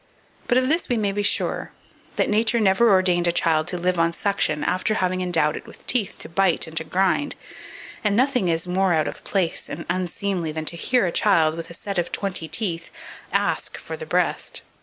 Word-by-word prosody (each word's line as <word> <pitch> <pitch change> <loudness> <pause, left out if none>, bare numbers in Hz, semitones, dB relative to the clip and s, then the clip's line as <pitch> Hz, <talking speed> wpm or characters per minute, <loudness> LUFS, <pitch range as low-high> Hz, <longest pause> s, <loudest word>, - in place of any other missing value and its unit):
But 245 - +3
of 255 0 +2
this 325 +5 +1
we 245 - +1
may 205 -2 +1
be 205 +1 -1
sure, 205 - -1 0.4
that - - +1
Nature 220 +2 +2
never 210 +3 +4
ordained 185 -3 +3
a - - +4
child 160 -2 +2
to 180 - -3
live 180 0 0
on 165 0 +2
suction 175 -5 0
after 185 +4 0
having 185 -2 0
endowed 165 -4 +2
it - - -8
with - - -15
teeth 230 -6 +1
to - - -8
bite 180 0 +2
and 160 0 -11
to 160 - +1
grind; 190 - 0 0.7
and 210 -2 +2
nothing 250 -4 +2
is 165 0 0
more 185 0 +1
out 155 -2 +1
of - - -7
place 185 -4 -1
and 165 +3 -6
unseemly 180 -1 -2
than 155 0 -4
to 170 - +1
hear 245 +6 +1
a 175 - 0
child, 165 -5 +3
with 165 0 -7
a 170 - -8
set 200 +1 -3
of 170 - -2
twenty 185 -5 -3
teeth, 170 -4 -3 0.4
ask - - 0
for - - -7
"the 475 0 -8
breast." - - -1
185 Hz, 210 wpm, -23 LUFS, 170-205 Hz, 0.7 s, never